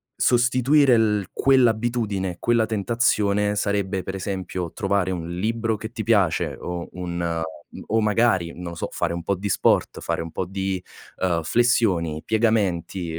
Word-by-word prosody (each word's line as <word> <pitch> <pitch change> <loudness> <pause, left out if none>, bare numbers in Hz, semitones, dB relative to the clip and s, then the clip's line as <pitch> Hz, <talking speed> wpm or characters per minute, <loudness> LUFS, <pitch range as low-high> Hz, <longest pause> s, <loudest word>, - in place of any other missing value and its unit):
Sostituire 125 +3 +3
il 105 -4 +2
quell'abitudine, 115 -7 +1
quella 115 -2 +2
tentazione 105 -2 +1
sarebbe, 100 -2 -1
per 95 - -5
esempio, 95 -3 -4
trovare 100 -2 0
un 85 -3 -4
libro 110 +6 -1
che 110 +2 -7
ti 115 -3 -5
piace 100 -8 +2
o 85 -1 -5
un 90 -1 -5
ehm 85 -1 -1 0.5
o 110 +1 +2
magari, 105 -5 +2
non 90 - -9
lo - - -8
so, - - -3
fare - - -1
un 85 0 -5
po' 100 - 0
di 100 +2 -4
sport, - - +2
fare - - -2
un 80 0 -7
po' 95 - -3
di, 95 0 -3 0.4
uhm, 85 -3 0
flessioni, 90 -8 +1
piegamenti, 95 -6 0
100 Hz, 155 wpm, -23 LUFS, 90-115 Hz, 0.5 s, Sostituire